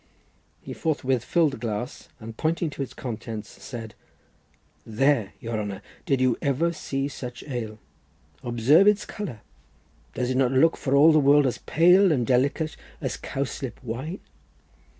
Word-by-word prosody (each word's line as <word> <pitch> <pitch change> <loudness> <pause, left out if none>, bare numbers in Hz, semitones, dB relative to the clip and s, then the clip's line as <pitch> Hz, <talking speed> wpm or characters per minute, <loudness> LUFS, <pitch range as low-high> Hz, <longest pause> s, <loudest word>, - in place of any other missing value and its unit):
He - - -7
forthwith 130 -6 -1
filled 165 +1 +2
the - - -7
glass, 115 +2 -5
and 115 0 -9
pointing 160 +3 -1
to 140 - -7
its 135 - -4
contents, 110 -3 -6
said— 115 -4 -7 0.9
"There, 115 -1 +1
your 115 -1 -3
honour, 100 -1 -5 0.2
did 135 -2 +2
you 130 -2 +2
ever 150 +5 +1
see 135 -3 -3
such 125 -3 -7
ale? 115 -6 -5 0.6
Observe 125 - +4
its 210 0 +3
colour! 145 - -6 0.7
Does 125 0 -1
it 130 - 0
not 130 -1 +2
look 160 +5 +4
for 135 0 -1
all 150 +4 +7
the 155 - +5
world 145 0 +5
as 125 - -1
pale 180 +3 +5
and 125 -6 +1
delicate 140 +6 +1 0.2
as - - -3
cowslip 135 -1 -5
wine?" 130 - -5
135 Hz, 150 wpm, -25 LUFS, 120-155 Hz, 0.9 s, all